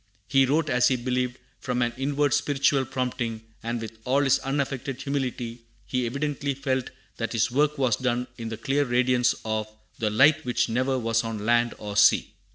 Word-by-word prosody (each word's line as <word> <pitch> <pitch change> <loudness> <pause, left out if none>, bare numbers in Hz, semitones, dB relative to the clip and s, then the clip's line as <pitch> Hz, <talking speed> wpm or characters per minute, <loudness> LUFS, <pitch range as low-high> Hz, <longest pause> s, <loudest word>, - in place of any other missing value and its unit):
He 135 -1 +4
wrote, 155 +4 +1
as 125 -3 +3
he 130 - +2
believed, 125 0 -1 0.2
from 125 -1 -1
an 120 0 -1
inward 140 +1 0
spiritual 140 -1 +2
prompting; 125 -3 -3 0.2
and 120 +1 -3
with 110 0 -8
all 130 +3 +2
his 135 -2 +3
unaffected 135 -1 -3
humility 130 -4 -3 0.3
he 125 +6 -1
evidently 140 +1 -2
felt 130 -2 -1 0.3
that 115 +1 -3
his 115 +1 +1
work 150 +3 +2
was 130 -6 +2
done 125 -1 0
in 115 -1 -6
the 110 - -5
clear 135 +5 +1
radiance 125 -1 +2
of 110 -1 -1 0.3
"The 110 - +1
light 140 +8 +4
which 125 -1 0
never 130 +3 0
was 115 -1 +1
on 110 -2 -4
land 120 +1 +2
or 105 -1 -6
sea." 105 0 +4
125 Hz, 180 wpm, -26 LUFS, 115-135 Hz, 0.3 s, He